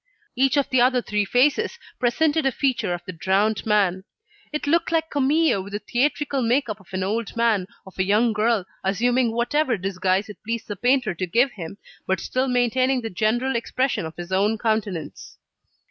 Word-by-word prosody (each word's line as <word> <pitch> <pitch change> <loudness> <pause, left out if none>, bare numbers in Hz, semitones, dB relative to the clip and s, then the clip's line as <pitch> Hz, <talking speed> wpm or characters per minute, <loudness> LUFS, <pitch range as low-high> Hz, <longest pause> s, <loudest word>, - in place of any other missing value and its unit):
Each 270 +3 +2
of 280 - +2
the 255 -2 +4
other 250 +1 +4
three 210 -1 0
faces 290 - +2 0.2
presented 300 +6 +2
a - - +2
feature 250 -8 0
of 175 0 -4
the - - -5
drowned 195 +6 0
man. 195 -3 +2 0.5
It 300 - -3
looked 330 +4 +1
like 325 -1 0
Camille 290 -4 +2
with 200 +1 -11
the - - 0
theatrical 275 +5 0
make 245 +4 +1
up 215 0 -4
of 190 - -20
an 185 0 -2
old 215 +4 -2
man, 220 -5 +2 0.2
of 190 0 -14
a - - +4
young 215 +4 +2
girl, 215 -2 +1 0.2
assuming 235 +5 +1
whatever 240 +2 +1
disguise 190 +1 0
it 210 - -11
pleased 230 0 -4
the 205 - -4
painter 245 0 +1
to 185 +2 -3
give 245 +9 +2
him, 195 -2 -8 0.3
but 190 -1 +1
still 255 +8 -1
maintaining 255 +1 +1
the 225 - -5
general 240 +7 0
expression 235 -5 -1
of 160 - -11
his 175 +1 -7
own 205 +4 +2
countenance. 210 -7 -3
230 Hz, 190 wpm, -23 LUFS, 195-260 Hz, 0.5 s, the